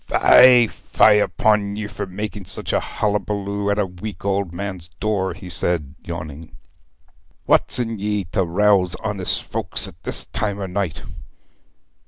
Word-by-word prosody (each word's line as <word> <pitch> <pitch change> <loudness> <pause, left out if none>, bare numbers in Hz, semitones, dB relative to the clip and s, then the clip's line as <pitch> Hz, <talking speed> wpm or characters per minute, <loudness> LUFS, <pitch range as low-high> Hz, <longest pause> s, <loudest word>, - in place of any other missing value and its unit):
'Fie, 125 -2 +7
fie 105 0 +3
upon 105 -1 +1
ye 105 0 -4
all 105 - -9
for 100 - -4
making 105 +2 -5
such - - -4
a - - +3
hullaballoo 100 -1 -2
at 100 - +1
a 105 - +2
weak 90 +1 -8
old 100 -2 0
man's 90 -2 -6
door,' 100 -2 -1
he 90 - -11
said, 85 -4 -1
yawning. 80 -1 -8 0.9
'What's - - +3
in 115 -3 -1
ye 105 0 -1
to 95 0 +1
rouse 90 0 +2
honest 100 -4 -1
folks - - -1
at - - -15
this - - -3
time 100 -2 -1
o' 100 - -3
night?' 90 -3 -3
100 Hz, 155 wpm, -21 LUFS, 90-105 Hz, 0.9 s, Fie